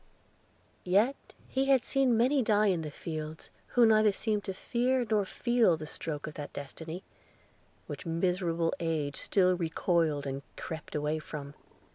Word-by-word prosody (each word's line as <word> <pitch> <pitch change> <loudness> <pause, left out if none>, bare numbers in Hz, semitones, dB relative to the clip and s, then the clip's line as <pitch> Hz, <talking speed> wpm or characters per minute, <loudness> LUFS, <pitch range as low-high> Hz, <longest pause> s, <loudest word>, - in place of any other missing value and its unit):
Yet 210 +9 +1
he 265 +1 0
had 270 -2 +4
seen 265 -4 +2
many 260 +4 +3
die 215 -2 +3
in 170 - -2
the 155 - -4
field, 155 +1 -6 0.2
who 245 -1 +4
neither 215 -1 +5
seemed 210 +1 -1
to 190 - -3
fear 250 +4 0
or 205 -2 +3
feel 235 -5 +2
the 155 - -7
stroke 150 -1 -1
of 155 - -7
that 145 -1 -7
destiny 160 +6 -7 0.8
which - - -7
miserable 170 -1 0
age 155 -4 -1
still 185 -2 +2
recoiled 165 -3 0
and 135 0 -3 0.2
crept 160 -1 -7
away 150 +1 0
from. 145 -2 -7
175 Hz, 150 wpm, -30 LUFS, 155-220 Hz, 0.8 s, neither